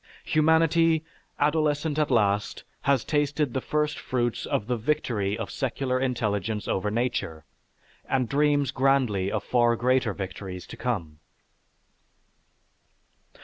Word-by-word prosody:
Humanity, 160 Hz, +1 st, +3 dB, 0.3 s
adolescent 150 Hz, 0 st, +1 dB
at 150 Hz, -, +1 dB
last, 105 Hz, -4 st, +1 dB, 0.2 s
has 140 Hz, -4 st, +2 dB
tasted 145 Hz, -3 st, 0 dB
the 130 Hz, -, -1 dB
first 150 Hz, +2 st, -1 dB
fruits 120 Hz, -2 st, -2 dB
of 100 Hz, -, -1 dB
the 125 Hz, +2 st, 0 dB
victory 115 Hz, -6 st, -1 dB
of -, -, -5 dB
secular 130 Hz, -1 st, -1 dB
intelligence 110 Hz, -5 st, -1 dB
over 100 Hz, +2 st, 0 dB
nature, 105 Hz, -9 st, -2 dB, 0.6 s
and 130 Hz, -2 st, 0 dB
dreams 145 Hz, 0 st, +2 dB
grandly 125 Hz, -8 st, +1 dB
of -, -, -2 dB
far 120 Hz, -1 st, +3 dB
greater 125 Hz, -2 st, +1 dB
victories 95 Hz, -1 st, -6 dB
to -, -, -10 dB
come. 95 Hz, -11 st, -3 dB
125 Hz, 115 wpm, -26 LUFS, 105-145 Hz, 0.6 s, Humanity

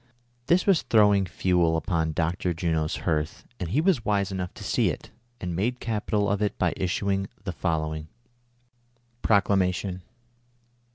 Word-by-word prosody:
" 120 Hz, 0 st, -40 dB
This 175 Hz, +2 st, +3 dB
was 195 Hz, -5 st, +4 dB
throwing 105 Hz, -3 st, +4 dB
fuel 85 Hz, -1 st, +2 dB
upon 80 Hz, -2 st, -1 dB
Dr. 85 Hz, +2 st, -1 dB
Juno's 80 Hz, -1 st, 0 dB
hearth, 75 Hz, -3 st, -1 dB
and 90 Hz, -, -3 dB
he 135 Hz, -, +2 dB
was 165 Hz, -, +2 dB
wise 100 Hz, -2 st, +1 dB
enough 90 Hz, -2 st, -3 dB
to -, -, -9 dB
see -, -, +2 dB
it, -, -, -6 dB, 0.3 s
and 90 Hz, -2 st, -3 dB
made 120 Hz, +8 st, -1 dB
capital 105 Hz, -2 st, -1 dB
of 100 Hz, +1 st, 0 dB
it 105 Hz, -, 0 dB
by -, -, +1 dB
issu 100 Hz, +2 st, -1 dB
ing 95 Hz, 0 st, -1 dB, 0.2 s
the 90 Hz, -, -3 dB
following: 80 Hz, -2 st, -2 dB, 1.1 s
PR0CLA3IATI0N. 95 Hz, -3 st, +2 dB
95 Hz, 155 wpm, -26 LUFS, 85-105 Hz, 1.1 s, was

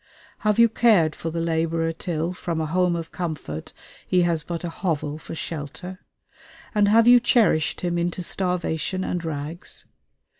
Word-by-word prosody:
Have 210 Hz, -1 st, +1 dB
you 235 Hz, 0 st, +7 dB
cared 215 Hz, -9 st, +3 dB
for 165 Hz, -, -4 dB
the 165 Hz, +1 st, -3 dB
laborer 165 Hz, 0 st, 0 dB
till, 165 Hz, +1 st, -2 dB
from 170 Hz, -2 st, -3 dB
a 160 Hz, -, 0 dB
home 180 Hz, +2 st, +1 dB
of 165 Hz, -1 st, -5 dB
comfort, 150 Hz, -, -5 dB, 0.4 s
he 180 Hz, -1 st, +3 dB
has 170 Hz, -2 st, +1 dB
but 170 Hz, +2 st, -5 dB
a 175 Hz, -, -2 dB
hovel 155 Hz, -4 st, -2 dB
for -, -, -8 dB
shelter? 165 Hz, +4 st, -6 dB, 0.7 s
and 210 Hz, -2 st, +4 dB
have 225 Hz, +2 st, +5 dB
you 245 Hz, 0 st, +9 dB
cherished 220 Hz, -, +2 dB
him 175 Hz, -1 st, 0 dB
into 175 Hz, +1 st, -2 dB
starvation 180 Hz, 0 st, -1 dB
and 175 Hz, -2 st, -2 dB
rags? 160 Hz, +2 st, -4 dB
170 Hz, 160 wpm, -24 LUFS, 160-185 Hz, 0.7 s, you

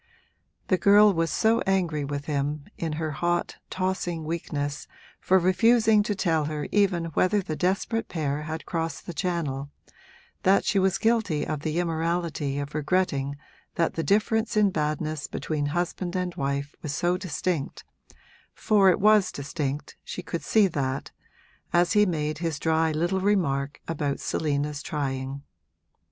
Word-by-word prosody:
The 185 Hz, -, +3 dB
girl 205 Hz, 0 st, +6 dB
was 165 Hz, -1 st, 0 dB
so 225 Hz, +1 st, +2 dB
angry 175 Hz, -6 st, +1 dB
with 140 Hz, 0 st, -4 dB
him, 145 Hz, 0 st, -2 dB
in 165 Hz, -2 st, -3 dB
her 155 Hz, 0 st, -2 dB
hot, 175 Hz, +3 st, -1 dB
tossing 185 Hz, -3 st, -2 dB
weakness, 150 Hz, -3 st, -3 dB, 0.3 s
for 190 Hz, -, +3 dB
refusing 220 Hz, +4 st, +4 dB
to 205 Hz, 0 st, -1 dB
tell 160 Hz, -5 st, +1 dB
her 150 Hz, -1 st, -3 dB
even 190 Hz, -5 st, +2 dB
whether 190 Hz, +6 st, +3 dB
the 160 Hz, -5 st, -4 dB
desperate 195 Hz, +6 st, 0 dB
pair 150 Hz, -3 st, -2 dB
had 155 Hz, +1 st, -5 dB
crossed 165 Hz, -3 st, -3 dB
the 175 Hz, -, -6 dB
Channel, 150 Hz, -6 st, -2 dB, 0.7 s
that 195 Hz, +1 st, +3 dB
she 200 Hz, -, +2 dB
was 190 Hz, -1 st, +2 dB
guilty 220 Hz, -10 st, +1 dB
of 155 Hz, -2 st, -3 dB
the 155 Hz, +2 st, -2 dB
immorality 165 Hz, -4 st, -1 dB
of 145 Hz, +1 st, -4 dB
regretting 145 Hz, -3 st, 0 dB, 0.4 s
that 165 Hz, -, +1 dB
the 165 Hz, -, -2 dB
difference 215 Hz, +6 st, +1 dB
in 205 Hz, -2 st, +4 dB
badness 155 Hz, -1 st, -2 dB
between 150 Hz, -2 st, -2 dB
husband 175 Hz, +3 st, -2 dB
and 180 Hz, -1 st, -1 dB
wife 140 Hz, 0 st, -2 dB
was 145 Hz, -1 st, -3 dB
so 175 Hz, +1 st, +1 dB
distinct 180 Hz, -4 st, -3 dB, 0.7 s
(for 205 Hz, -4 st, +4 dB
it 180 Hz, -, +3 dB
was 210 Hz, -1 st, +5 dB
distinct, 140 Hz, 0 st, -4 dB
she -, -, -6 dB
could 170 Hz, -, -4 dB
see 215 Hz, -2 st, +4 dB
that) 135 Hz, -5 st, -3 dB, 0.6 s
as 175 Hz, +1 st, +3 dB
he 210 Hz, -1 st, +5 dB
made 155 Hz, -3 st, -2 dB
his 165 Hz, -3 st, -2 dB
dry 160 Hz, +1 st, +1 dB
little 175 Hz, +5 st, 0 dB
remark 145 Hz, -9 st, 0 dB
about 145 Hz, -4 st, -2 dB
Selina's 145 Hz, -1 st, -1 dB
trying. 135 Hz, -2 st, -3 dB
165 Hz, 150 wpm, -26 LUFS, 150-185 Hz, 0.7 s, girl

